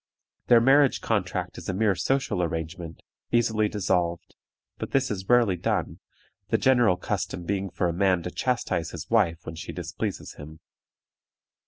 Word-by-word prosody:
Their 120 -1 +6
marriage 135 +2 +5
contract 100 -6 -2
is - - -7
a 95 - -1
mere 105 0 +3
social 130 +3 0
arrangement, 80 0 -4 0.3
easily 110 -3 +2
dissolved, 90 -5 -1 0.5
but - - -6
this 135 -2 +2
is 95 -2 -5
rarely 120 -6 +4
done, - - -2 0.5
the - - +2
general 120 -8 +4
custom 90 - -3
being 95 +1 -2
for 90 0 -1
a 85 - -1
man 90 -1 +2
to 90 - -4
chastise 100 -10 -1
his 80 +1 -8
wife 90 -8 +2
when 80 - -6
she 80 -1 -7
displeases 90 +4 -5
him. 80 +2 -10
95 Hz, 155 wpm, -26 LUFS, 85-115 Hz, 0.5 s, Their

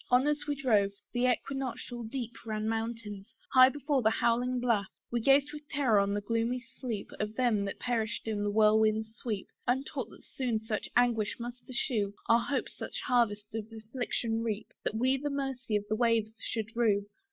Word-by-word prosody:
On 250 +2 +5
as 295 0 0
we 290 - 0
drove, 215 -8 +2 0.2
the 245 +1 +2
equinoctial 250 -1 -3
deep 240 0 -4
Ran 215 -1 -2
mountains 225 -2 -4 0.2
high 255 0 +9
before 285 0 0
the 220 - +4
howling 245 +3 +1
blaft. 230 -5 +1 0.2
We 240 - +1
gazed 275 +4 +4
with 300 0 -9
terror 255 -7 +3
on 200 0 +1
the 205 - -1
gloomy 230 +4 0
sleep 235 -3 -6
Of 210 +1 -2
them 230 -5 +2
that 195 - -4
perished 230 -3 -2
in 215 -2 -1
the 205 - +1
whirlwind's 220 +1 +3
sweep, 220 -5 -4 0.2
Untaught 260 -1 -1
that - - -14
soon 245 -4 -1
such 220 -1 -3
anguish 235 -4 +3
must 240 +1 -6
ensue, 220 -5 -1
Our 230 +1 +6
hopes 260 +3 -2
such - - -5
harvest 210 -5 +1
of 225 0 -5
affliction 225 0 -2
reap, 220 -2 -2
That - - -1
we 260 +4 +3
the 290 +2 -2
mercy 270 -5 -2
of 205 0 0
the 215 - 0
waves 225 -2 +2
should 225 +1 -4
rue. 210 -4 +3
230 Hz, 185 wpm, -31 LUFS, 215-255 Hz, 0.2 s, high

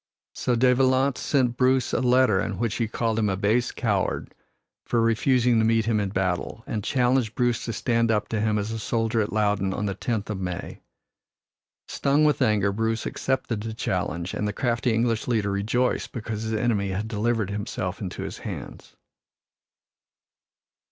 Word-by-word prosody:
So 125 - 0
De 125 +2 +4
Valence 130 +1 +2
sent 125 -4 +1
Bruce 130 0 +2
a - - +1
letter 125 -5 +4
in 105 -3 -3
which 115 -1 -1
he 115 - 0
called 115 0 -1
him 105 -2 +1
a 95 - -1
base 110 +5 +2
coward - - -1 0.5
for 120 - 0
refusing 115 +1 +3
to - - +3
meet 115 0 +2
him 110 -2 +1
in 100 -2 -1
battle, 95 -2 -2
and 105 -2 -3
challenged 125 -2 +1
Bruce 120 -2 +1
to 115 - -2
stand 115 0 +1
up 105 -2 +1
to 110 -2 -1
him 110 -1 +1
as 105 +1 -2
a 115 - -3
soldier 115 0 0
at 105 - -2
Loudon 105 -3 +1
on 105 - -2
the 100 - -1
tenth 110 +1 -3
of 100 - -4
May. 90 -1 -5 1.1
Stung 145 +2 +2
with 150 -1 +2
anger, 105 -5 +3
Bruce 110 +2 -1
accepted 120 -5 -2
the 110 0 -5
challenge 90 -4 -2
and 105 - -1
the 105 - -2
crafty 120 +1 0
English 115 0 0
leader 110 -5 +1
rejoiced 110 +6 0
because 110 -2 -4
his 110 0 -3
enemy 105 -3 0
had 100 +3 -2
delivered 110 -1 -1
himself 100 -3 -4
into 95 -3 -5
his - - -6
hands. - - -8
110 Hz, 180 wpm, -25 LUFS, 105-120 Hz, 1.1 s, De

